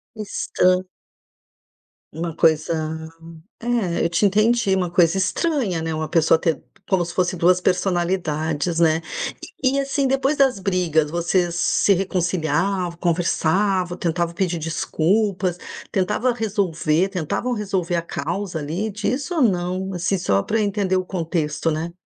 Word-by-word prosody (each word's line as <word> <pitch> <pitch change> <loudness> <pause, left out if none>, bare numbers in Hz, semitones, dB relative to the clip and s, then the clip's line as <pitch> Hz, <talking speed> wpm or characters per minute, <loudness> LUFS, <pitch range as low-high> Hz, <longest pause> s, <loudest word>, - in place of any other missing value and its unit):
Esta 185 -3 0 1.3
Uma 165 +1 -4
coisa 160 0 +2 0.9
É, 225 -7 0
eu - - +2
te 190 +4 +3
entendi, 215 +1 +3
uma 180 -2 0
coisa 175 0 +3
estranha, 210 - 0
né, 160 0 -2
uma 155 0 -3
pessoa 165 -1 +4
ter 165 -4 0 0.3
como 185 -3 +2
se 170 - -8
fosse 185 0 0
2 180 +2 +3
personalidades, 175 -4 0
né. 160 -1 +4 0.6
E, 270 +1 +2
assim, 275 0 0
depois 270 +2 +1
das 270 -6 +3
brigas, 175 -6 +1
vocês 170 +1 0
se 195 +3 +3
reconciliava, 180 0 -1
conversava, 175 +2 +1
tentava 170 -1 -1
pedir 175 -1 -1
desculpas, 180 +4 0 0.4
tentava 210 +6 +1
resolver, 190 -6 0
tentavam 185 +7 -2
resolver 190 -5 -2
a 170 - 0
causa 170 +4 -4
ali 165 +9 -3
disso 255 - -2
ou 310 - +3
não? 185 -2 0
Assim, 185 +2 0
só 100 - +1
pra 225 - 0
entender 200 -2 0
o 185 - 0
contexto, 165 -3 -1
né? 160 +2 -3
180 Hz, 135 wpm, -22 LUFS, 165-200 Hz, 1.3 s, pessoa